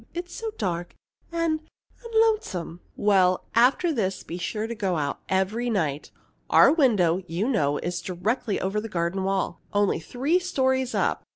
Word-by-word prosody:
It's 350 0 -5
so 450 - -4
dark 175 -1 -3 0.4
and 335 -2 0 0.4
and 465 -1 -9
lonesome." 190 - -2 0.2
"Well, 185 -3 +3
after 265 +8 +4
this, 195 -7 -1
be 175 - -6
sure 215 +4 -2
to 230 - -4
go 195 -6 -1
out 145 -2 -2
every 205 +6 0
night. 155 -9 -1 0.4
Our 280 - +7
window, 200 - +3
you 175 +7 -1
know, 145 - +1
is 175 0 -3
directly 200 +4 -2
over 195 +3 -1
the 225 - -6
garden 175 +1 -1
wall, 190 -3 -1
only 205 -4 +2
three 270 - 0
stories 260 -7 0
up. - - +1
205 Hz, 160 wpm, -25 LUFS, 180-260 Hz, 0.4 s, Our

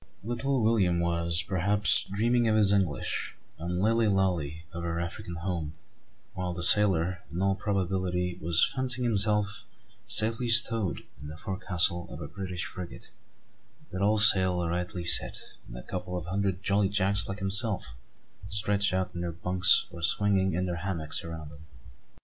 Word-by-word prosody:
Little 120 +3 -2
William 100 -6 +2
was, 85 0 0
perhaps, 100 +2 +1
dreaming 120 +4 +1
of 110 - +2
his 105 -2 +3
English, 95 -8 -2 0.2
and 90 +2 -4
Lilly 115 +3 +2
Lalee 90 -6 -1
of 85 - -6
her 85 0 -3
African, 85 0 -6
home; 85 -3 -5 0.6
while 90 -1 -4
the 85 - -3
sailor, 90 -2 +5
in 85 - -5
all 95 +1 +1
probability, 95 -3 -2
was 80 +1 +4
fancying 130 -1 -1
himself 105 -2 +1 0.4
safely 115 +2 +3
"stowed" 115 -5 +3 0.2
in 75 - -9
the 75 +1 -9
forecastle 90 -1 -1
of 75 - -9
a 75 - -7
British 90 0 -6
frigate, 85 -10 -9 0.8
with 95 - -5
all 105 +2 +2
sail 95 -5 +4
rightly 90 +1 -4
set, 85 0 +2 0.3
and - - -10
a 60 - -9
couple 90 0 -6
of 85 - -6
hundred 95 +1 -3
jolly 100 0 +1
Jacks 100 0 0
like 95 - -5
himself 100 - +2 0.6
stretched 105 -1 0
out 95 0 -2
in 85 - -6
their 85 -1 -3
"bunks" 90 +2 +3
or 85 0 -10
swinging 95 +1 +3
in 90 +1 -1
their 90 -1 -4
hammocks 85 -4 -3
around 80 -2 -8
him. 80 +1 -15
95 Hz, 160 wpm, -27 LUFS, 85-105 Hz, 0.8 s, sailor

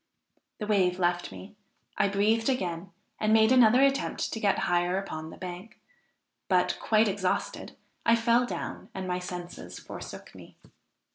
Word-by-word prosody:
The 210 - -4
wave 190 -4 +2
left 175 -1 0
me; 205 +2 -11 0.4
I 205 - +2
breathed 215 +4 +2
again, 180 -7 -2 0.3
and 215 0 +1
made 220 +1 +5
another 250 0 +6
attempt 275 0 0
to 225 - -3
get 205 -2 +2
higher 175 +1 +1
upon 160 -5 -5
the - - -11
bank, 180 +3 -8 0.7
but, 180 -1 +2
quite 220 0 +3
exhausted, 190 -2 -2 0.3
I 230 - +5
fell 235 +1 +2
down - - -6
and 190 -1 -4
my 180 0 -1
senses 175 - -7
forsook - - -9
me. - - -14
195 Hz, 150 wpm, -28 LUFS, 180-225 Hz, 0.7 s, another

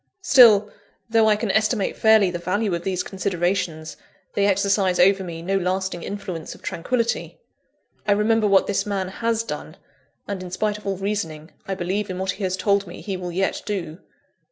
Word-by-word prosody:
Still, 225 - +7 0.4
though 225 -1 +4
I 210 - +5
can 210 -1 -1
estimate 215 0 +1
fairly 220 -4 +4
the 175 - -4
value 200 +3 -1
of 170 0 -2
these 185 -1 -1
considerations, 175 -4 -2 0.4
they 200 0 +2
exercise 195 -1 +2
over 195 +1 +5
me 165 -2 -7
no 195 +2 0
lasting 185 -1 -2
influence 185 -5 -6
of - - -19
tranquillity. 230 +6 -2 0.7
I 205 - +5
remember 215 +1 +2
what 195 -1 +4
this 200 -1 0
man 195 -2 -2
has 230 +3 -1
done; - - -7 0.5
and 200 -2 -4
in 185 - -7
spite 210 +3 -1
of 210 - -11
all 195 -1 -1
reasoning, 170 -6 -4 0.2
I 195 - -2
believe 190 +3 -2
in 185 - -4
what 190 +1 -1
he 195 - -7
has 185 0 -1
told 200 +1 +1
me 175 - -9
he 195 -3 -4
will 180 -1 -5
yet 190 +3 -1
do. 175 -5 -4
195 Hz, 185 wpm, -23 LUFS, 180-210 Hz, 0.7 s, Still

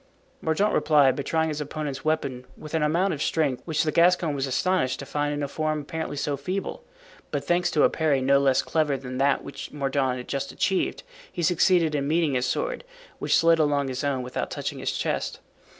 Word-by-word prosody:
Mordaunt 180 +7 +1
replied 145 -4 +4
by - - -3
trying 160 +2 0
his 150 -1 -3
opponent's 145 -2 -4
weapon 140 -5 -1
with 155 - -10
an 160 - +1
amount 170 +6 +2
of 145 - -5
strength 145 -7 0
which 160 -1 0
the 155 - 0
Gascon 170 -2 +3
was 135 -1 -2
astonished 130 -1 +1
to - - -7
find 145 0 -1
in 145 0 -2
a - - -1
form 155 +1 -2
apparently 160 0 -5
so 145 +1 -1
feeble; 190 - -4 0.5
but 145 -2 -2
thanks 175 +3 +1
to 150 - +2
a - - +6
parry 155 -4 +1
no 135 +1 +4
less 135 -2 +3
clever 150 -3 0
than 130 0 -6
that 140 0 +2
which 140 - -8
Mordaunt 135 -2 0
had 125 - -8
just 140 0 -3
achieved, 190 -2 -1 0.3
he 175 - -4
succeeded 175 -1 +3
in 140 -1 -1
meeting 160 -1 +2
his 125 -1 0
sword, - - -2 0.4
which - - +2
slid 165 0 +4
along 145 -2 +2
his 130 +2 -4
own 135 -3 0
without 125 - -4
touching - - -4
his - - -1
chest. - - -2
150 Hz, 210 wpm, -25 LUFS, 140-160 Hz, 0.5 s, a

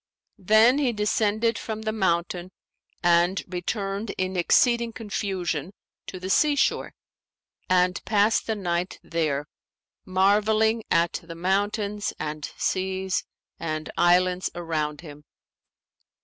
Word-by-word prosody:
Then 220 +7 +5
he 260 -5 +1
descended 215 +2 +1
from 220 -1 -5
the 220 - -1
mountain 180 -3 -1 0.5
and 175 +2 +3
returned 195 +3 -3
in 185 0 -2
exceeding 235 +6 +3
confusion 190 -6 -3 0.3
to 185 - -7
the 185 - -6
sea 290 +9 +3
shore 285 - 0 0.7
and 180 0 +2
passed 215 +1 +2
the 220 - 0
night 180 -2 -2
there, 150 -4 -1 0.6
marvelling 215 +4 +2
at 170 0 +2
the 165 -1 -10
mountains 205 +3 -1
and 150 -1 -5
seas 190 0 -1 0.3
and 155 -2 -4
islands 180 +1 +3
around 155 -3 -3
him. 150 -3 -11
190 Hz, 110 wpm, -25 LUFS, 175-215 Hz, 0.7 s, Then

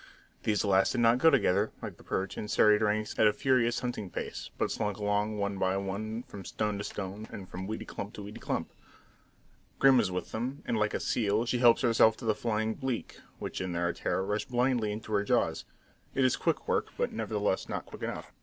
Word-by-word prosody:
These 105 -1 +1
last 95 -1 +3
did 120 - +1
not 115 +1 +5
go 160 - +7
together, 105 - +3
like - - -7
the - - -16
perch, 95 +1 -2
in 105 - -5
serried 105 0 +5
ranks 105 0 +1
at 110 - +7
a 105 - +4
furious 125 -4 +2
hunting 120 -6 -3
pace, - - -5
but - - 0
slunk 105 -2 -2
along 105 +1 0
one 100 -1 -2
by 95 +1 +1
one 110 +4 -3
from 100 -5 -10
stone 105 +1 -2
to - - -3
stone, 100 +2 -5
and 95 -2 -8
from 95 +1 -6
weedy 110 +1 -4
clump 100 - -6
to 105 - -7
weedy 105 +1 -8
clump. - - -3 1.1
Grim 135 -2 +6
is 105 -5 +2
with 90 0 -4
them, 125 +5 -4
and - - 0
like 105 -1 +1
a - - 0
seal 110 0 +1
she 125 0 0
helps 120 +1 +6
herself 115 -2 +5
to - - -8
the 110 - +3
flying 110 0 -1
bleak 130 -3 -4 0.2
which - - -5
in 95 -1 -3
their 85 0 0
terror 95 - -1
rush 105 +2 -1
blindly 120 -3 +1
into 110 +1 -5
her 100 -1 +3
jaws. - - +1 0.5
It 135 - +3
is 130 - +3
quick 165 - -1
work, 460 -2 +1
but 485 0 -1
nevertheless - - -1
not - - -3
quick - - -11
enough. - - -5
105 Hz, 220 wpm, -30 LUFS, 100-120 Hz, 1.1 s, go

